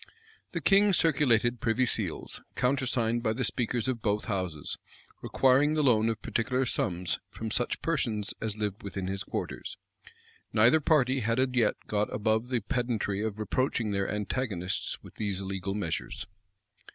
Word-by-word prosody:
The - - -2
king 200 0 +5
circulated 125 -8 +3
privy 125 0 +2
seals, - - -1
countersigned 125 -3 +1
by 110 -2 +1
the 125 +3 -2
speakers 120 +1 0
of 125 -3 -1
both 105 0 0
houses, 90 -8 -3 0.4
requiring 135 +4 +3
the 155 - +2
loan 115 -4 +4
of 115 -1 -3
particular 125 +3 0
sums 90 -6 -1
from 110 -1 -5
such 120 +2 0
persons 115 -10 0
as 110 -1 -2
lived 105 +1 -3
within 100 -2 -5
his 95 +1 -3
quarters.[*] - - -5 0.8
Neither 115 +8 +6
party 135 -4 +3
had 115 +1 0
as 130 0 +3
yet 120 -4 +3
got 105 0 0
above 110 +3 0
the 125 -3 0
pedantry 115 -4 -1
of 110 -1 -2
reproaching 115 0 0
their 100 -1 0
antagonists 105 -3 -2
with - - -12
these 100 -3 -1
illegal 95 0 -3
measures. 90 -6 -3
115 Hz, 150 wpm, -29 LUFS, 105-130 Hz, 0.8 s, Neither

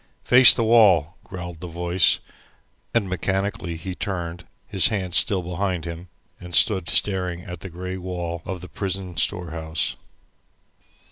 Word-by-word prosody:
"Face 125 0 +9
the 115 - 0
wall," 100 -8 +4
growled 85 -2 -8
a - - -5
voice, 85 +1 +2 0.7
and 115 -4 +1
mechanically 95 -1 -2
he 90 +3 -6
turned, 90 -2 -5 0.2
his 95 - +2
hands 95 -5 -3
still 95 -3 +2
behind 90 -1 -3
him, 85 +1 -7 0.3
and 90 -1 -4
stood 95 -6 +4
staring 90 -3 0
at 90 -4 -8
the 95 - -8
grey 90 +2 -6
wall 85 -2 -5
of 95 -3 -6
the 90 - -7
prison 95 -2 -4
storehouse. 80 -3 -2
90 Hz, 140 wpm, -23 LUFS, 85-95 Hz, 0.7 s, Face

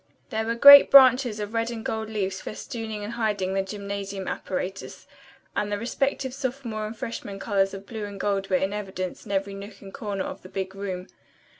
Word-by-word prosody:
There 220 0 -1
were 230 - 0
great 280 +3 +10
branches 255 -4 +7
of 210 +1 -5
red 230 0 0
and 225 -2 -6
gold 220 0 -3
leaves 195 -3 -2
festooning 220 -1 -6
and 210 +3 -5
hiding 205 -5 -1
the 195 - +1
gymnasium 200 -1 -5
apparatus, 190 +1 -5 0.5
and 205 0 -1
the 205 - 0
respective 260 +3 -2
sophomore 250 -5 -4
and 220 +1 -8
freshman 205 -4 -6
colors 195 -1 0
of 195 0 -9
blue 220 -2 -6
and 200 -1 -8
gold 195 -1 -1
were 185 - +2
in 190 +2 0
evidence 190 -2 -5
in - - -6
every 195 0 -1
nook 200 +1 -9
and 195 -1 -12
corner 205 -6 -3
of - - -7
the 185 - -12
big 190 0 -4
room. 190 -2 -5
205 Hz, 195 wpm, -25 LUFS, 195-225 Hz, 0.5 s, great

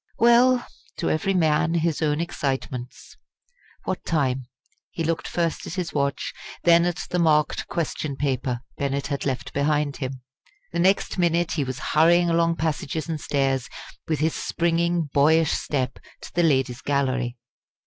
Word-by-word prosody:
Well! 240 +1 +5 0.3
to - - 0
every 195 +5 0
man 160 -1 +2
his 165 -2 0
own 150 -1 +1
excitements! 130 -6 -4 0.7
What - - -3
time? 130 -5 0 0.4
He 165 - -4
looked 165 0 -1
first 170 -2 -2
at 165 - -5
his 180 -3 -3
watch, 140 -1 -1 0.3
then 170 0 +6
at 175 -1 -2
the 180 - +1
marked 155 -2 +2
question 155 -3 -3
paper 130 -3 -1 0.2
Bennett 140 -1 -1
had 140 0 -2
left 130 -2 -3
behind 145 0 +1
him. 130 -1 -5 0.5
The 170 - -2
next 190 +1 +2
minute 175 -1 +2
he 150 - 0
was 130 -1 -4 0.2
hurrying 170 +2 +5
along 165 0 +2
passages 155 -1 -2
and 160 -2 -3
stairs, 135 -3 0 0.4
with 155 -3 -1
his 160 +1 +2
springing, 170 0 0
boyish 155 +2 +4
step, 130 -4 -2 0.2
to - - -10
the 175 - +2
Ladies' 135 -6 +1
Gallery. 130 -3 0
155 Hz, 150 wpm, -24 LUFS, 140-170 Hz, 0.7 s, then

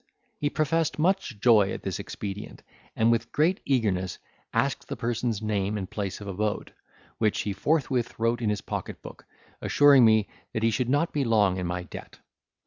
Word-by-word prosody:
He 145 - +1
professed 155 +2 0
much 165 - 0
joy 105 -4 +5
at - - -6
this - - -3
expedient, 100 0 -7 0.3
and 115 +1 +3
with 115 0 0
great 170 +6 +2
eagerness 100 -9 0 0.3
asked - - 0
the - - -4
person's 115 -2 -2
name 105 -1 -1
and 95 -2 -4
place 100 -2 -4
of 100 - -9
abode, 105 +1 -2 0.5
which 110 -2 +1
he 100 - -2
forthwith 130 0 0
wrote 115 +1 0
in 110 - +1
his 105 -1 -1
pocket - - -6
book, - - -11 0.4
assuring 145 -3 +6
me, 110 -2 +5 0.3
that 110 - -2
he 115 - +4
should 125 +2 -1
not 145 +5 +1
be 145 - +1
long 105 -6 +3
in 90 -1 -2
my 90 +1 -3
debt. - - -10
110 Hz, 180 wpm, -27 LUFS, 100-135 Hz, 0.5 s, assuring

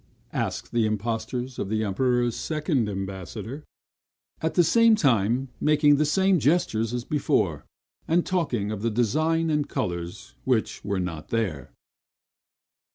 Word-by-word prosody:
asked - - -3
the 115 -2 +2
impostors 115 +4 -3
of 95 - -3
the 110 0 0
Emperor's 120 +3 +1
second 150 - -1
ambassador; 95 - -6 0.8
at 160 - -1
the 175 - +6
same 230 +5 +5
time 125 - +2
making 150 -1 +4
the 150 - +2
same 190 +4 +3
gestures 135 -8 +1
as 120 -1 -3
before, 150 -2 0 0.4
and 170 +2 +2
talking 125 - -1
of 105 -2 -4
the 115 - +1
design 155 +9 +1
and 150 -1 0
colors 90 +8 -4
which 125 -4 0
were 100 -1 -1
not 85 -4 -4
there. 85 - -2
120 Hz, 135 wpm, -25 LUFS, 105-150 Hz, 0.8 s, the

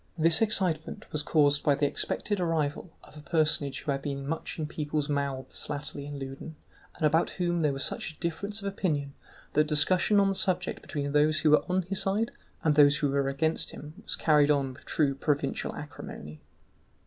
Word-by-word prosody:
This 160 +2 +4
excitement 185 -8 +1
was 150 - 0
caused 145 -2 +3
by 145 - +4
the 145 +1 +1
expected 205 +7 -1
arrival 165 -2 -1
of - - -16
a 150 - -10
personage 150 -3 +1
who 145 - -2
had 135 0 -2
been 140 -1 -4
much 160 +2 -4
in 155 - -2
people's 150 -1 -2
mouths 140 -2 -3
latterly 145 -1 -5
in 145 -1 -6
Loudun, 135 +4 -7 0.4
and 155 - -1
about 160 +3 +3
whom 175 -2 0
there 150 -2 +2
was 135 -1 -3
such 160 - -4
difference 200 +5 -3
of - - -2
opinion 150 -8 -2 0.4
that 150 +1 +3
discussion 185 +7 +4
on 200 - +4
the - - +1
subject 185 -2 0
between 145 -2 -4
those 155 +1 +3
who 155 - +4
were 150 - +5
on 185 +1 +1
his 190 +2 -1
side 210 +4 0 0.3
and 155 - +3
those 145 -1 +6
who 145 -3 0
were 140 -1 +1
against 160 +4 0
him 150 +1 -10
was - - -1
carried 150 -2 +4
on 140 -3 +1
with 130 - -17
true 145 -3 +1
provincial 145 +1 -1
acrimony. 75 +1 -9
150 Hz, 195 wpm, -28 LUFS, 145-170 Hz, 0.4 s, those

